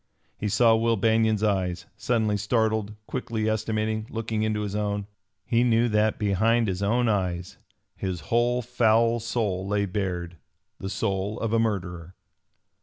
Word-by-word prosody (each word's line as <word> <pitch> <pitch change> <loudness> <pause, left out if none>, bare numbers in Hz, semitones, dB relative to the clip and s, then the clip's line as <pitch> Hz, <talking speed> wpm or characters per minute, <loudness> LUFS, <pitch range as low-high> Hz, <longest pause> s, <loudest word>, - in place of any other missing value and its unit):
He 105 - -3
saw 115 +2 +5
Will 115 0 +2
Banion's 110 0 +2
eyes, 90 -4 0
suddenly 110 -4 0
startled, 110 0 0
quickly 110 0 -3
estimating, 110 0 -1
looking 110 -1 -2
into 110 -1 0
his 105 -1 -3
own. 105 -1 -1 0.4
He 120 0 +2
knew 120 -1 +3
that 105 0 +2
behind 110 +3 +2
his 95 0 -2
own 120 +4 +2
eyes 90 -4 -1 0.4
his 90 -3 -4
whole 120 +7 +1
foul 115 0 +3
soul 105 -5 -2
lay 100 0 +1
bared 90 -3 -3 0.4
the 95 - -4
soul 100 +1 -2
of 115 -1 -2
a 115 - +4
murderer. 90 -5 -2
110 Hz, 145 wpm, -26 LUFS, 100-115 Hz, 0.4 s, saw